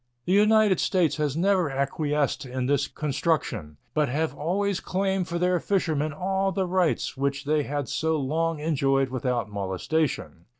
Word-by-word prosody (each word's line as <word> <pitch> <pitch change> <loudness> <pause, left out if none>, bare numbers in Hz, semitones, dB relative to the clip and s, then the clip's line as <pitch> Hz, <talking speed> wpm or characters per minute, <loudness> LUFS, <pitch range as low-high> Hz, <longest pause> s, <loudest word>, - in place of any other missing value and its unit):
The 180 - +1
United 210 -1 +5
States 180 -6 +2
have 150 -2 -1
never 185 -2 +2
acquiesced 140 +1 -1
in 130 -1 -3
this 140 +1 +1
construction, 135 - -2 0.2
but 150 -3 +1
have 155 +5 -1
always 195 +5 -1
claimed 190 -1 -1
for 170 - -2
their 180 0 +2
fishermen 160 -7 0
all 190 +4 -1
the 190 0 0
rights 180 -2 0
which 140 +1 -2
they 150 +1 +2
had 145 -1 -3
so 160 +3 0
long 160 +4 0
enjoyed 135 -3 +1
without 125 -2 -1
molestation. 100 - -2
155 Hz, 155 wpm, -26 LUFS, 135-180 Hz, 0.2 s, United